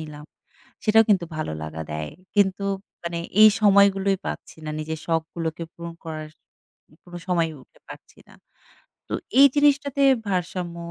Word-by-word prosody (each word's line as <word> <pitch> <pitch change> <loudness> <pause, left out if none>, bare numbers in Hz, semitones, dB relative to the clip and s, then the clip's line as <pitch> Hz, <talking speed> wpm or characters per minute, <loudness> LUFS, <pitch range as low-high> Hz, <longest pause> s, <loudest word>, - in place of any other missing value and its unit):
নিলাম। 150 -1 -9 0.6
সেটাও 225 +1 +5
কিন্তু 185 -4 +3
ভালো 155 - -3
লাগা 80 +1 -6
দেয়। 75 0 -5 0.2
কিন্তু 200 0 +2 0.4
মানে 170 0 -3 0.2
এই 215 - +11
সময়গুলোই 200 -1 +4
পাচ্ছি - - -6
না। 155 - -3
নিজের 160 0 -4
শখগুলোকে 165 0 -2
পূরণ 170 0 -8
করার 155 -1 -6 0.8
কোন 175 -1 -14
সময়ই 165 -3 0
উঠে - - -26
পাচ্ছি - - -13
না। - - -18 0.8
তো - - -4 0.3
এই 280 - +10
জিনিসটাতে 285 -1 +2 0.3
ভারসাম্য 180 -2 -3
170 Hz, 140 wpm, -24 LUFS, 160-200 Hz, 0.8 s, এই